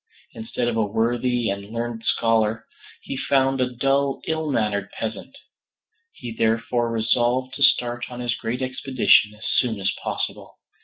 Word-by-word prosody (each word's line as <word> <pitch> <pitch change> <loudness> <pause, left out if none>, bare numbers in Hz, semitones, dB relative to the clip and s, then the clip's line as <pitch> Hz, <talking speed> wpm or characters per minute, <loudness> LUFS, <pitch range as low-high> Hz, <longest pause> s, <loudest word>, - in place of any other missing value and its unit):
Instead 115 +2 -3
of 120 - 0
a 110 - +2
worthy 115 +2 +1
and 100 +1 -6
learned 115 0 -3
scholar, 115 -1 +1 0.4
he - - -5
found 135 0 +2
a 125 - +2
dull 135 +2 +1
ill 160 -1 -1
mannered 105 -6 0
peasant. 115 - -5 0.7
He 120 - -8
therefore 115 +1 +1
resolved 120 +3 +1
to - - -8
start 120 -3 +2
on 125 -1 -8
his 120 -1 -1
great 120 +2 -3
expedition 130 -5 +3
as 105 - -12
soon 115 -5 0
as 95 - 0
possible. - - -4
120 Hz, 150 wpm, -23 LUFS, 110-130 Hz, 0.7 s, expedition